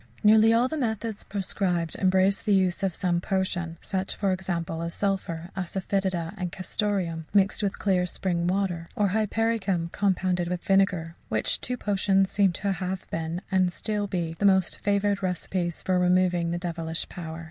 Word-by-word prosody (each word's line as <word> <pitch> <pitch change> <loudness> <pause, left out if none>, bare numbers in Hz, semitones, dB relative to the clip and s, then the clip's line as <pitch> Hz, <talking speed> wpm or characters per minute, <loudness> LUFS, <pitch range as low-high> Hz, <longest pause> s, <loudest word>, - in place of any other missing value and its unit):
Nearly 220 +1 +7
all 235 +2 +4
the 315 +3 -3
methods 220 -3 -2
prescribed 185 -4 -1
embrace 190 +1 +3
the 210 -3 +2
use 185 -2 +2
of 195 -1 +1
some 175 0 0
potion; 175 -3 -1
such, 190 -1 -2
for 200 -2 0
example, 170 -3 -2
as 170 0 -4
sulphur, 185 -4 -2
asafœtida, 190 -2 -2
and 180 -2 -3
castoreum, 185 -4 -2
mixed 195 +2 +3
with 200 -1 -1
clear 185 -3 +1
spring 175 -1 -1
water; 180 -3 -1
or 205 -2 +2
hypericum, 210 -4 0
compounded 185 -2 0
with 180 0 -3
vinegar 185 -4 +2
which 110 - 0
two 250 0 -3
potions 195 -2 +2
seem 200 -2 +3
to 200 +3 -1
have 185 0 -3
been 165 +3 -3
(and 185 -1 +3
to 210 +1 -2
be 175 -4 -2
still) - - -8
the - - -2
most 190 -2 +4
favoured 200 0 +1
recipes 180 -2 -2
for 185 -1 +2
removing 180 -1 +2
the 170 - -1
devilish 165 -2 -3
power. 165 -2 -7
185 Hz, 170 wpm, -26 LUFS, 175-200 Hz, -, Nearly